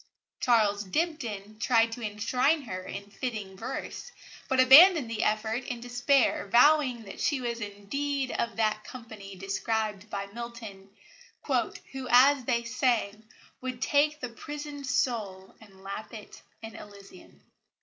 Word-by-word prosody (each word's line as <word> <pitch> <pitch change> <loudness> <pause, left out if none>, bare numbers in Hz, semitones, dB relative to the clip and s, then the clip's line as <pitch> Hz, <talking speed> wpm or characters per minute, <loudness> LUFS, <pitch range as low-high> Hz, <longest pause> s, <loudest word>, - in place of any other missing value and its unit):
Charles 210 -4 +2
Dibdin 215 - -3
tried 230 0 +3
to 240 - -7
enshrine 250 +8 0
her 185 -6 -6
in 200 +2 -8
fitting 215 -6 -5
verse, 255 - -6 0.4
but 265 - +1
abandoned 275 0 +8
the 220 -1 -2
effort 220 +3 0
in 245 - -5
despair, 245 -1 +1
vowing 250 +1 +4
that 195 - -10
she 290 -4 +1
was 235 -2 -4
indeed 260 +7 -3
of 235 -1 -2
that 215 -1 0
company 220 -6 -10
described 210 +2 -3
by 200 -1 -4
Milton: 220 -2 -9 0.6
"Who, 265 -1 -3
as 260 +1 +5
they 235 -2 0
sang, 235 -3 -1 0.3
would 255 -1 -5
take 295 +3 +2
the 250 - -5
prisoned 290 +3 -8
soul 210 -7 -2
And 195 -3 -17
lap 200 +4 -7
it 215 - -11 0.2
in 225 0 -8
Elysium." 200 -3 -14
230 Hz, 135 wpm, -28 LUFS, 205-260 Hz, 0.6 s, abandoned